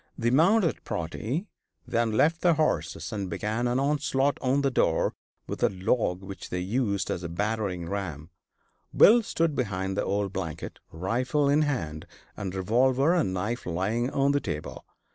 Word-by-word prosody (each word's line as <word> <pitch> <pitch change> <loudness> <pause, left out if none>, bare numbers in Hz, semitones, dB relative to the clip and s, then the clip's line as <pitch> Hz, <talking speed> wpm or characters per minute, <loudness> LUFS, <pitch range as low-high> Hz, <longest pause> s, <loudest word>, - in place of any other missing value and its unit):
The 120 0 +1
mounted 170 - +3
party 110 - -3 0.4
then 115 -1 +1
left 160 +9 +3
their 175 -2 +4
horses 155 -5 -1
and 100 -3 -3
began 110 +6 -1
an 120 +2 +1
onslaught 140 -1 +1
on 135 +2 +1
the 135 - +2
door - - +2 0.3
with - - -6
a - - +4
log 95 -1 0
which 95 0 -8
they 90 - -2
used 100 +1 -1
as 85 - -2
a 85 - -5
battering 100 -2 -2
ram. 85 -5 -5 0.7
Bill 235 +3 +8
stood 165 -7 0
behind 95 -5 -2
the - - 0
old 100 -1 -1
blanket, 85 -5 -5
rifle 125 - 0
in 145 +2 +4
hand, 80 - -2 0.3
and 95 -2 -5
revolver 130 - +3
and 165 - +1
knife 105 +6 -3
lying 105 +8 0
on 140 0 +2
the 145 0 +1
table. 75 - -5
115 Hz, 160 wpm, -27 LUFS, 95-140 Hz, 0.7 s, Bill